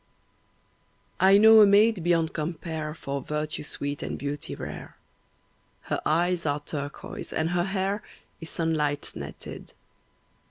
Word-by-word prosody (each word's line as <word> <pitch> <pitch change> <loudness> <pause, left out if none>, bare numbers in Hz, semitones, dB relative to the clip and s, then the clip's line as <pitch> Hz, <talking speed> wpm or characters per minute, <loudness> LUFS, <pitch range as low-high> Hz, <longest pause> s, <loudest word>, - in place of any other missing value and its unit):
I 190 +1 +7
know 220 +1 +8
a 210 - +8
maid 205 0 +5
beyond 165 -2 +2
compare 155 -1 -4
For 140 -3 -4
virtue 150 +2 -3
sweet 145 -1 -3
and - - -4
beauty 145 0 -4
rare. - - -8 0.8
Her - - -3
eyes 175 +2 +1
are 145 -1 0
turquoise 145 -1 -6
and 160 +2 -1
her 175 0 +1
hair 195 +1 -1 0.4
Is 165 -1 -7
sunlight 155 -3 -1
netted. - - -9
165 Hz, 125 wpm, -27 LUFS, 150-185 Hz, 0.8 s, know